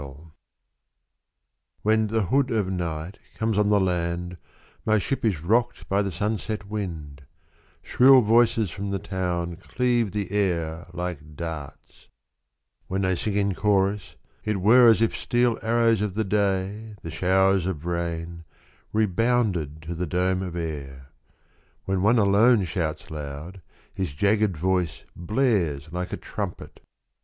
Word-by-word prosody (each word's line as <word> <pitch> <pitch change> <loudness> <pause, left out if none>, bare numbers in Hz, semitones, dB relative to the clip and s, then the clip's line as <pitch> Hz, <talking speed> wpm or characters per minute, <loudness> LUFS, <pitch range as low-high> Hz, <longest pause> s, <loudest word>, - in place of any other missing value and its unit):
TI7HEN 110 0 +3
the 110 0 +1
hood 135 +8 +1
of 105 -5 0
night 85 0 -4 0.2
comes 110 -1 0
on 105 0 +2
the 105 -1 +4
land 90 -1 -1 0.5
My 110 0 +3
ship 135 +7 -2
is 100 -9 0
rocked 120 +6 +1
by 100 +1 +2
the 100 -1 -2
sunset 105 +2 -3
wind 80 -9 -5 0.3
— - - -35
Shrill 130 +1 +6
voices 115 -3 +3
from 100 +3 -5
the 100 - -1
town 90 -3 -3
Cleave 120 +1 0
the 100 -2 -3
air 85 -5 -1
like 85 -4 -6
darts; 75 -4 -8 0.8
When 95 +1 -1
they 95 0 +1
sing 100 +3 -2
in 100 -1 +1
chorus 100 -3 0 0.3
It 105 -1 -1
were 115 +5 +7
as 115 0 +4
if 115 - 0
steel 120 -1 +1
arrows 115 -1 +2
of 105 -3 -2
the 110 - +1
day, 100 +1 -1
The 80 - -6
showers 95 +2 +2
of 85 -4 -4
rain, 85 -1 -3 0.5
rebounded 105 - 0
to 85 +2 -5
the 85 +1 -3
dome 90 +3 0
of 90 -3 -5
air. 70 -5 -6 0.7
When 95 -1 0
one 110 +5 +4
alone 105 +2 +4
shouts 80 -4 -3
loud, 75 +5 -7 0.3
his 95 -7 -3
jagged 105 +1 +2
voice 90 -1 -1
Blares 85 - 0
like 90 +1 -4
a - - -3
trumpet. - - -6
95 Hz, 140 wpm, -25 LUFS, 85-110 Hz, 0.8 s, were